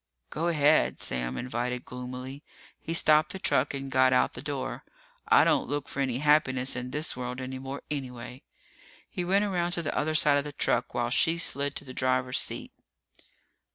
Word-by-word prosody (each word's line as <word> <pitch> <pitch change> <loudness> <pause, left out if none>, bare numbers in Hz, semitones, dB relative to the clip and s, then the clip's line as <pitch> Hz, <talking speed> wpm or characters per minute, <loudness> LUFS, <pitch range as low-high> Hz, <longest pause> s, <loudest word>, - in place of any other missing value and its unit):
"Go 165 +3 -2
ahead," 155 -2 +3
Sam 60 -1 -1
invited 125 0 -3
gloomily. 125 +2 -7 0.4
He - - -6
stopped 155 -1 +4
the - - -5
truck 145 -6 +1
and 135 0 -6
got 130 0 +4
out 125 - +2
the 125 - -8
door. 135 -2 -4 0.4
"I - - +6
don't - - +2
look 145 -1 -2
for - - -7
any 130 -3 0
happiness 135 -3 +2
in 125 0 -4
this 150 +4 -2
world 125 0 -5
any 130 0 -5
more, 135 +1 -7
anyway." 125 -3 -6 0.7
He 180 - -4
went 195 +4 +2
around 175 -3 -1
to 170 - -1
the 155 - -3
other 155 +1 0
side 145 -2 +4
of - - -3
the 145 0 -7
truck 125 -2 0
while 120 0 -1
she 165 +6 +3
slid 140 -4 +1
to - - -6
the 130 - -9
driver's 130 0 +1
seat. - - -3
135 Hz, 190 wpm, -28 LUFS, 125-150 Hz, 0.7 s, I